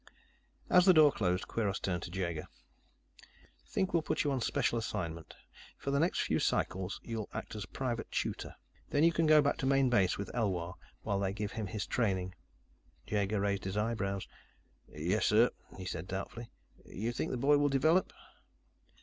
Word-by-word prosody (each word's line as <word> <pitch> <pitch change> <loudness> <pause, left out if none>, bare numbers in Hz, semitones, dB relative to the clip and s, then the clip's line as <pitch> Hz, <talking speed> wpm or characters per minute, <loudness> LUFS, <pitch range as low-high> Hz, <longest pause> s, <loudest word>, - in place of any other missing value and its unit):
As 180 +1 +5
the 185 - +8
door 155 -2 +7
closed, 90 -5 -1
Kweiros 105 -4 -1
turned 90 -3 -2
to - - -6
Jaeger. 85 -4 -3 1.2
"Think 190 -1 -1
we'll 170 - +3
put - - -1
you 145 - +1
on 130 -2 -1
special 115 +1 +1
assignment. 85 -7 -4 0.4
For 140 - -3
the 140 - +2
next 170 +4 +2
few - - +1
cycles, 95 +1 -1
you'll 115 -3 -4
act - - -5
as 105 -3 -5
a - - -22
private 120 +3 -3
tutor. - - -3 0.3
Then 145 - +2
you 165 - +6
can 165 -1 +1
go 155 -1 +7
back 145 - +1
to 130 - -1
Main 135 -2 +3
Base 95 -6 +3
with 100 - -5
Elwar 95 -7 -1 0.3
while 100 -2 0
they 95 -1 -1
give 105 0 -3
him 110 -2 -4
his 100 +1 -3
training." 95 -6 0 0.7
Jaeger 105 0 0
raised 100 -1 -1
his 95 +1 -3
eyebrows. 105 -3 -1 0.6
"Yes, 85 +8 0
sir," 115 +3 +5 0.3
he 95 - -7
said 90 -1 -4
doubtfully. 100 +5 -5 0.3
"You 110 +4 -4
think 120 - -2
the 130 - -2
boy 145 +4 +4
will 145 0 +3
develop?" 155 +7 +3
105 Hz, 180 wpm, -32 LUFS, 95-135 Hz, 1.2 s, the